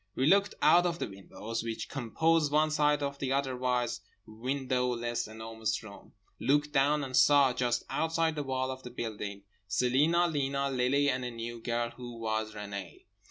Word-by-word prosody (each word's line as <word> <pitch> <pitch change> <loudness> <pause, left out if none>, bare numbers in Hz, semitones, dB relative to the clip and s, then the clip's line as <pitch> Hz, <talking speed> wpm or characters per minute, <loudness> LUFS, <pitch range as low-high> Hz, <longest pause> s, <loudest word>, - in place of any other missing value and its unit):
We 130 - +1
looked 200 +5 +4
out 175 +1 +6
of 170 -1 -2
the - - -3
windows 105 +3 -6
which 115 0 -4
composed 150 +5 +1
one 155 +1 +3
side 150 -1 +2
of 140 0 -3
the 135 -1 -2
otherwise 125 -4 0 0.2
windowless 125 0 -2
Enormous 110 +1 -4
Room; 100 -2 -13 0.3
looked 145 +3 +2
down, 145 +1 +3
and 130 -1 -4
saw—just 130 -3 +4
outside 165 0 0
the 150 - -3
wall 130 -1 -1
of 130 0 -7
the 125 - -8
building—Celina, 115 - 0
Lena, 140 -3 -1
Lily 135 +3 +2
and 130 -2 0
a 125 - -3
new 115 0 -6
girl 120 0 -1
who 120 -1 -9
was 110 -1 -2
Renée. 100 -3 -7
130 Hz, 160 wpm, -30 LUFS, 115-145 Hz, 0.3 s, out